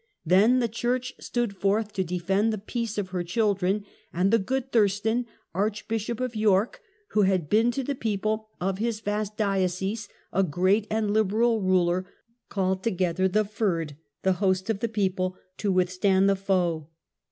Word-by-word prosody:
Then 200 +9 +5
the 245 -2 +2
church 245 +3 -2
stood 240 -5 -2
forth 205 +2 0
to 190 - 0
defend 185 +5 0
the 215 - -2
peace 220 +1 -4
of 200 -3 -2
her 180 -1 -2
children; 200 +1 0 0.3
and 185 +3 +1
the 230 - +6
good 265 +5 -2
Thurstan, 220 +2 +2 0.3
Archbishop 215 +4 -2
of 255 -2 -2
York, 215 0 +2 0.3
who 215 - +2
had 190 -6 +1
been 225 +3 +4
to 270 +3 -2
the 280 - -2
people 215 -2 -2
of 190 +1 -1
his 225 -1 -1
vast 210 0 -3
diocese 195 +1 -1 0.2
a 195 - +3
great 190 +5 +2
and 215 -1 0
liberal 220 +2 +2
ruler, 185 -1 +2 0.4
called 190 -1 0
together 185 -3 +1
the 210 +3 +1
^rd 180 -8 -1 0.3
(the 190 - +3
host 190 +1 +2
of 205 - -3
the 230 +1 -1
people) 185 -3 -1 0.2
to 205 - 0
withstand 185 +1 +2
the 200 - +4
foe. 180 -5 0
200 Hz, 165 wpm, -26 LUFS, 185-220 Hz, 0.4 s, the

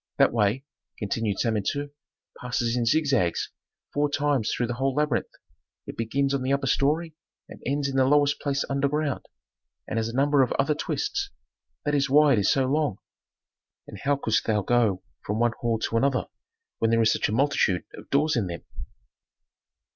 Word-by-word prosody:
That - - +4
way," 115 +4 +1 0.3
continued 105 -1 -2
Samentu, 120 +6 -1 0.5
"passes 120 -1 -1
in 120 -2 0
zigzags 135 - +1 0.4
four 145 0 +1
times 145 -6 0
through 120 - 0
the 120 - -3
whole 135 +1 -1
labyrinth; 150 0 0 0.6
it - - -8
begins 135 +5 0
on 140 - 0
the 130 +1 -1
upper 140 0 +1
story 155 +5 +1 0.3
and - - -12
ends 140 +1 0
in 135 -1 -2
the 130 - +4
lowest 145 0 +3
place 140 -1 -1
underground, 140 +1 -1 0.6
and 115 - -1
has 110 - -1
a 115 - -7
number 140 +1 +3
of 130 - +2
other 140 +2 +1
twists. 400 - -2 0.6
That 145 - 0
is 140 -2 +2
why 145 +1 +6
it 115 - +3
is 100 - +2
so 135 -1 +2
long." 145 -5 0 0.9
"And - - -10
how 140 +1 +1
couldst 110 -5 0
thou 105 -2 +1
go 110 -4 +2 0.2
from 105 - -2
one 120 0 +2
hall 115 -1 0
to 115 +1 -1
another 135 +2 +1 0.5
when 115 - +2
there 115 0 +3
is 110 - +4
such - - 0
a - - -2
multitude 115 -7 +2
of - - -12
doors 150 +2 +2
in 110 -6 0
them?" 85 -2 -6
135 Hz, 180 wpm, -26 LUFS, 115-145 Hz, 0.9 s, why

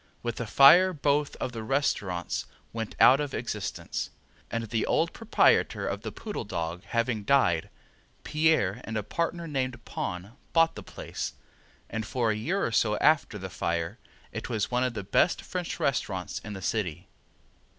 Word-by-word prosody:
With 120 -1 -3
the 115 - -3
fire 175 +10 +7
both 145 -1 +1
of 125 - -3
the 115 -2 -5
restaurants 105 - -1 0.3
went 115 -1 -4
out 130 +3 +8
of 145 -2 -2
existence, - - -3 0.4
and 115 0 -2
the 115 0 -1
old 165 +1 +2
proprietor 225 0 +3
of - - -3
the - - -5
Poodle 210 - -5
Dog 85 -4 -4
having 115 0 0
died, 100 -10 +3 0.5
Pierre 150 -10 +2
and 110 0 -4
a 105 - -1
partner 170 - -2
named 130 -5 -3
Pon 90 +3 -4 0.2
bought 165 0 +5
the - - -8
place, - - -6 0.5
and 110 0 -3
for 115 0 0
a - - 0
year 175 - 0
or - - -1
so 105 -1 +2
after 150 -7 +3
the 95 -1 -5
fire 85 -1 -2 0.3
it - - -5
was 110 -2 -1
one 125 +1 +2
of 125 -2 -1
the 100 - -3
best 100 - +2
French 180 -2 -4
restaurants 95 -9 -1
in 110 - -8
the 95 -2 -7
city. 95 -7 -2
115 Hz, 170 wpm, -28 LUFS, 105-145 Hz, 0.5 s, out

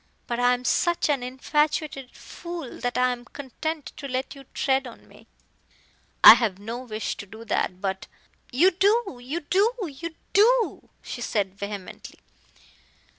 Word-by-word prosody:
But 240 0 -3
I 245 0 +4
am 250 0 -9
such 345 +5 +2
an 280 -3 +1
infatuated 275 +1 -1
fool 340 -4 -8
that 245 0 -2
I 250 0 +3
am 245 -1 -5
content 285 +2 -6
to 280 - -6
let 260 0 -3
you 275 -1 -13
tread 265 0 0
on 235 - -13
me." - - -18 1.0
"I - - +14
have 215 -6 0
no 225 +4 -6
wish 220 -4 -4
to 200 - -8
do 220 +3 -11
that, 185 -4 -1
but 190 +1 -3 0.2
" - - -33
"You 335 +10 +5
do 395 - +1
you 290 +8 -4
do 390 +9 +2
you 325 +2 -7 0.2
do!" 460 +4 +3
she 245 - -6
said, 200 -5 -1
vehemently. 200 -1 -8
260 Hz, 160 wpm, -25 LUFS, 235-320 Hz, 1.0 s, I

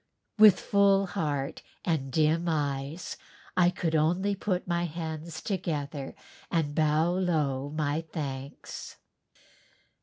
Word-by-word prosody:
With 210 -3 +9
full 200 -1 +4
heart 145 -7 -2 0.2
and 150 -6 0
dim 160 +4 +2
eyes 145 +1 -2 0.4
I 175 -1 +5
could 175 -2 -2
only 175 +6 +2
put 190 -2 -2
my 175 0 +1
hands 160 -1 -5
together 150 -7 -3 0.3
and 155 -4 0
bow 155 +2 +3
low 150 -7 0
my 150 0 -1
thanks. 140 -3 -6
160 Hz, 110 wpm, -29 LUFS, 145-180 Hz, 0.4 s, With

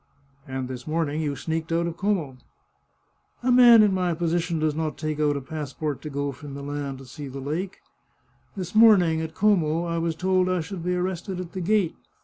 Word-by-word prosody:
" 140 0 -32
And 130 -1 -4
this 125 0 -7
morning 155 -1 -1
you 145 -2 -1
sneaked 160 +2 -3
out 170 +1 +1
of 170 -1 -3
Como! 175 -8 -1 0.3
" - - -44
" 75 - -40
A 255 - +2
man 240 -3 +8
in 205 -2 +3
my 180 -2 0
position 170 0 0
does 155 -1 +1
not 155 0 -3
take 155 -1 -3
out 145 -1 +2
a - - -4
passport 150 0 -4
to 155 - -6
go 140 0 -2
from 140 +1 -9
Milan 140 -1 -4
to 135 - -12
see 140 +3 -8
the 135 +1 -7
lake. 160 +8 -4 0.8
This 180 -2 -5
morning, 195 -8 +6
at 160 0 -6
Como, 170 -6 +2
I 170 0 -1
was 165 -1 -1
told 185 +1 +1
I 185 -2 +1
should 170 +1 -6
be 180 +1 0
arrested 180 +1 -3
at 180 -2 -6
the 190 - -5
gate. 200 -1 +1
160 Hz, 215 wpm, -25 LUFS, 145-180 Hz, 0.8 s, man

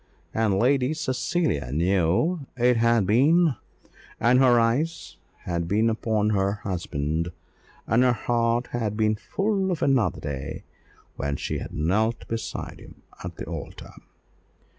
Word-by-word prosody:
And 110 -3 +1
Lady 130 +5 +2
Cecilia 135 - -1
knew 95 - +1
that 120 -1 0
it 125 -1 +4
had 115 -2 +3
been; 145 - +4 0.6
and 125 +3 +4
her 125 -3 +5
eyes 135 +9 -1 0.2
had 85 -1 -3
been 110 +5 +2
upon 110 -1 0
her 100 -1 +1
husband, 85 -5 -3 0.5
and 115 +3 +3
her 125 -1 +5
heart 120 +1 0
had 110 -3 -2
been 110 -1 +2
full 195 - -1
of 170 - -2
another 125 - +2
day 70 -3 -5 0.5
when 70 0 -2
she - - -3
had - - -7
knelt 105 +9 0
beside 115 0 -5
him - - -15 0.2
at - - -6
the - - -6
altar. - - -8
115 Hz, 140 wpm, -25 LUFS, 95-130 Hz, 0.6 s, her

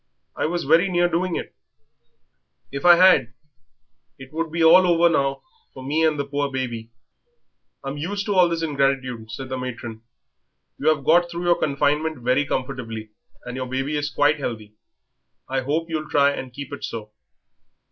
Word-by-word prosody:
I - - -1
was 175 +1 -2
very 165 +7 +4
near 175 -1 +2
doing 175 +1 -1
it. - - -5 1.2
If 140 +4 -5
I 175 -1 +9
had 170 -10 +4 0.8
it 135 +2 -13
would 165 0 -3
be 165 0 0
all 180 +3 +7
over 170 0 +4
now 135 0 -1 0.3
for 130 - -9
me 150 +4 0
and 155 -2 +2
the 140 - -2
poor 140 0 -2
baby." 120 -4 -4 0.9
"I'm 135 +2 -5
used 200 +6 -3
to 205 - -1
all 180 -2 +5
this 165 -1 -2
ingratitude," 135 -6 -1
said 130 +2 -7
the 130 0 -3
matron. 120 -3 -6 0.8
"You 145 - -2
have 150 -3 0
got 175 +2 +4
through 170 0 -5
your 175 -1 +2
confinement 150 +2 0
very 125 +3 +1
comfortably, 115 -6 -4 0.3
and 125 0 -6
your 130 0 -4
baby 135 +4 -2
is 145 0 -1
quite 145 +1 +2
healthy; 110 -5 -5 0.7
I 135 0 -1
hope 155 +5 -1
you'll 155 -2 -4
try 140 0 +4
and 130 -2 -6
keep 140 +2 -8
it 140 - -8
so. 110 -2 -6
145 Hz, 175 wpm, -23 LUFS, 130-165 Hz, 1.2 s, I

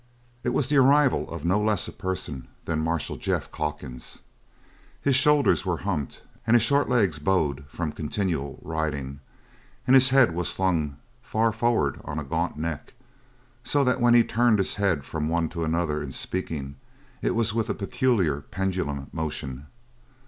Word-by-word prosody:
It - - 0
was 135 - +1
the 145 +1 +2
arrival 140 +1 +4
of 85 -2 -6
no 95 +4 +2
less 105 -3 +1
a - - -6
person 90 -9 -5 0.2
than 80 -2 -1
Marshal 80 -1 -2
Jeff - - -2
Calkins. 75 -5 -5 0.8
His 140 -2 +2
shoulders 145 +2 +4
were 90 -3 -1
humped 80 -9 -3 0.2
and 115 - +5
his 120 - +5
short 140 +3 +3
legs 100 - +2
bowed 75 -4 0
from 80 +2 -4
continual 80 -4 -3
riding, 75 -4 -3 0.7
and 130 - +5
his 130 -1 +7
head 130 -8 +5
was 90 0 -1
slung 80 -7 0 0.2
far 115 +1 +1
forward 110 - 0
on 75 - -5
a 75 - -2
gaunt 80 +4 -2
neck; 80 -1 -5 0.7
so 145 -1 +2
that 125 -1 +1
when 120 0 +5
he 120 - +7
turned 120 -1 +3
his 95 - 0
head 95 -9 0
from 80 0 -3
one 85 -1 0
to 85 -2 -4
another 80 -2 0
in 70 -2 -5
speaking 70 -3 -4 0.4
it - - 0
was 115 -2 +1
with 115 -1 -1
a - - 0
peculiar 100 - +1
pendulum 90 -7 -3
motion. 75 -4 -4
85 Hz, 165 wpm, -26 LUFS, 75-115 Hz, 0.8 s, his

